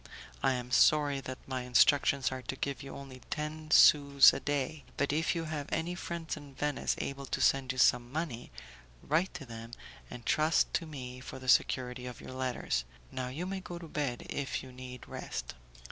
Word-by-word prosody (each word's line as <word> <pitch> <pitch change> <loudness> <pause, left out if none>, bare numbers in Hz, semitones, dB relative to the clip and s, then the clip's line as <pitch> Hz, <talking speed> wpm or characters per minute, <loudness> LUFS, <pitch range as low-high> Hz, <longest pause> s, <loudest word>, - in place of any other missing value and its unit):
I 135 - +3
am 125 -1 -5
sorry 145 0 +4
that 130 0 -6
my 130 -1 -3
instructions 130 +2 +4
are 130 0 -4
to 125 +2 -5
give 140 +1 -3
you 135 - -8
only 135 -2 -10
ten 155 +1 -4
sous 140 -2 +7
a - - -2
day, 145 +1 -2
but 145 0 +1
if 160 +3 +1
you 165 - -1
have 155 -2 -4
any 165 +2 -1
friends 170 -2 -4
in 145 -3 -12
Venice 145 0 -1
able 140 0 -4
to - - -2
send 135 -1 +3
you 130 - -7
some 125 -1 +4
money, 150 -6 -4 0.5
write 165 +6 +1
to 155 -6 -6
them, 115 -1 -8 0.4
and 120 - -9
trust 155 0 +2
to 165 - -1
me 125 -4 -7
for 130 - -8
the 130 0 -10
security 125 0 +2
of 125 - -8
your - - -9
letters. 130 - -1 0.3
Now 130 -1 -3
you 145 +8 -4
may 190 +1 -3
go 175 -2 -7
to 170 -1 -9
bed, 140 -6 -3
if 140 -2 -3
you 130 - -10
need 125 0 -9
rest." - - -5
140 Hz, 195 wpm, -31 LUFS, 125-155 Hz, 0.5 s, sous